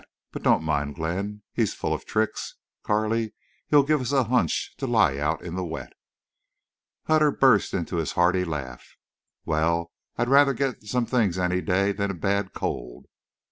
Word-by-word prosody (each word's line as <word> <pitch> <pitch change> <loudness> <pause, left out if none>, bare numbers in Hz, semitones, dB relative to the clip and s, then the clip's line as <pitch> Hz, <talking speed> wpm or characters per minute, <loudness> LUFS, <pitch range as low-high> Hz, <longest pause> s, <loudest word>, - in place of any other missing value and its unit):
But - - -6
don't - - +3
mind 75 -2 -1
Glenn. 100 +7 -3
He's - - 0
full - - -2
of - - -5
tricks, 110 0 -2 0.3
Carley. 110 +1 0 0.3
He'd 145 -2 +5
give 150 -1 +2
us 125 - -2
a 135 -2 +3
hunch 125 +2 0
to 135 - -3
lie 95 - +3
out 75 +2 -1
in 85 - -6
the 95 0 -2
wet." 85 - -6 1.1
Hutter 155 -1 +4
burst 130 -7 +3
into 85 -1 -2
his 80 -2 -2
hearty 90 +1 +3
laugh. 70 -7 -6 0.5
"Wal, 85 +2 0 0.3
I'd - - 0
rather 140 +1 +5
get 135 -1 -2
some 120 +3 -1
things 110 -8 +1
any 90 0 0
day 100 +1 +1
than 100 0 -2
a 100 - -3
bad 100 +2 -1
cold." - - -5
100 Hz, 170 wpm, -25 LUFS, 85-120 Hz, 1.1 s, He'd